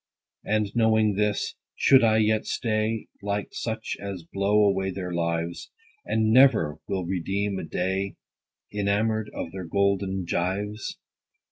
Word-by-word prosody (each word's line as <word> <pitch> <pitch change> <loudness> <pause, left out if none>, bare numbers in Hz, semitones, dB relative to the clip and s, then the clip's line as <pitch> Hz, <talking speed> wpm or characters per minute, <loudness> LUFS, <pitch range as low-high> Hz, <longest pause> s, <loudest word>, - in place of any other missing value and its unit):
20 110 - +1
And, 105 -2 -2
knowing 110 -2 +3
this, 105 +1 0 0.2
should 135 -3 +5
I 110 -1 +4
yet 110 0 +2
stay, 110 -1 -1 0.2
Like 100 0 -2
such 110 -1 -3
as 100 -3 -5
blow 100 +4 +2
away 95 -1 +1
their 90 -1 -4
lives, 85 0 -2 0.4
And 110 0 +2
never 120 - +5
will 95 -2 -2
redeem 95 +2 -1
a - - -5
day, 95 +4 -2 0.6
Enamour'd 105 +1 0
of 80 - -4
their 95 -2 -6
golden 95 +1 0
gyves 95 +4 -2
100 Hz, 135 wpm, -26 LUFS, 95-110 Hz, 0.6 s, should